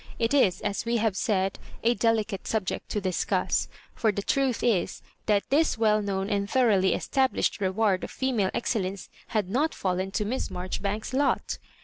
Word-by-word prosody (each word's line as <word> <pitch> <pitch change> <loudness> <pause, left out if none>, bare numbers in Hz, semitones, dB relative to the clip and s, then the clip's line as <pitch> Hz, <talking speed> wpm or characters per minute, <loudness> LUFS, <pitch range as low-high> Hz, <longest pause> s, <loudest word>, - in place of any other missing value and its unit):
It 230 +3 0
is, 195 -11 +3
as 200 - -2
we 235 +1 0
have 220 -3 +1
said, 195 -3 0 0.2
a 235 +1 +4
delicate 220 -4 0
subject 215 -4 -2
to 210 - -1
discuss; 185 -3 0 0.3
for 220 - +1
the 200 0 -4
truth 270 -1 +1
is, 215 -7 +1 0.2
that 205 -2 +2
this 315 -1 +3
well 215 -1 +3
known 195 -1 -2
and 200 -1 -1
thoroughly 215 -8 +3
established 265 -5 0
reward 195 0 +1
of - - -4
female 240 -8 0
ex - - -1
cellence 195 -3 -3 0.2
had 210 -4 0
not 280 +11 0
fallen 185 0 -1
to 210 - 0
Miss 250 +5 -2
Marjoribanks's 195 +5 -3
lot. 280 +1 +1
210 Hz, 170 wpm, -27 LUFS, 195-235 Hz, 0.3 s, a